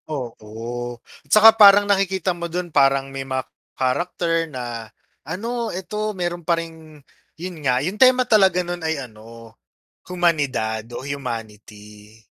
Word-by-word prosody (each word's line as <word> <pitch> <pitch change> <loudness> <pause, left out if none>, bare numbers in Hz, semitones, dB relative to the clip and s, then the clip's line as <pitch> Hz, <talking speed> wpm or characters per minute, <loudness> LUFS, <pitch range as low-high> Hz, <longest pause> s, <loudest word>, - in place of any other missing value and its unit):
Oo, 120 -2 -6 0.3
tsaka 220 +1 +8
parang 205 -2 +7
nakikita 190 -2 +1
mo 170 0 -6
dun 175 -1 -5
parang 135 -1 +2
may 135 - -4 0.6
character 165 +4 -1
na 120 -5 -6 0.3
ano 230 - -4
eto 210 +3 -4
meron 175 -1 -3
pa 170 +1 +1
ring, 160 -2 -9 0.4
yun 180 +2 -6
nga 125 -3 +1
yung 195 +4 -4
tema 255 -1 +6
talaga 190 -6 +3
nun 175 0 -5
ay 160 -1 -1
ano, 115 -2 -11 0.6
humanidad 145 -11 0
o 130 - -8
humanity. 110 -5 -8
160 Hz, 125 wpm, -21 LUFS, 120-180 Hz, 0.6 s, tsaka